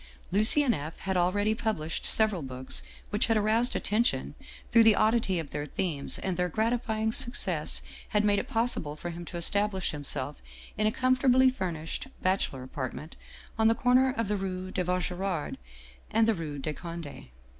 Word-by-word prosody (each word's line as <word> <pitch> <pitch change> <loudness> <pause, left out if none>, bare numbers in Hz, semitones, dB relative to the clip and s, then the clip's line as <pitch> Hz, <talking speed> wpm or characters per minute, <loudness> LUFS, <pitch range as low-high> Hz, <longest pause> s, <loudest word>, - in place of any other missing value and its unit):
" - - -26
Lucien 235 +7 +5
F. 155 +2 -5
had 190 -1 -2
already 205 +4 +2
published 215 -9 -2
several 215 -5 +3
books 130 - -4 0.3
which - - +1
had 225 - +2
aroused 220 +3 +2
attention 230 +3 0 0.4
through 230 - +7
the 225 -2 +6
oddity 215 -4 +2
of 160 -4 -5
their 145 0 -4
themes, 155 -4 +1
and 185 -3 -3
their 180 0 0
gratifying 220 +2 0
success 250 +1 +1 0.3
had 210 0 +1
made 205 -1 +3
it - - -5
possible 225 -10 0
for 175 +3 -6
him 170 +1 -8
to 175 - -7
establish 200 +2 +1
himself 145 -1 -3 0.3
in 215 0 +1
a - - +2
comfortably 255 +1 +3
furnished 175 -2 -4 0.2
bachelor 185 -8 0
apart 130 0 -5
ment 155 +2 -9 0.4
on 220 - +5
the 225 - +4
corner 255 +2 +3
of 230 -2 -1
the 210 +1 0
rue 185 -1 -4
de 185 - -1
Vaugirard 180 -1 -2 0.5
and 225 +1 +3
the 225 - +4
rue 160 -6 -5
de 150 +2 -3
Conde. 170 -2 -8
195 Hz, 175 wpm, -28 LUFS, 165-225 Hz, 0.5 s, through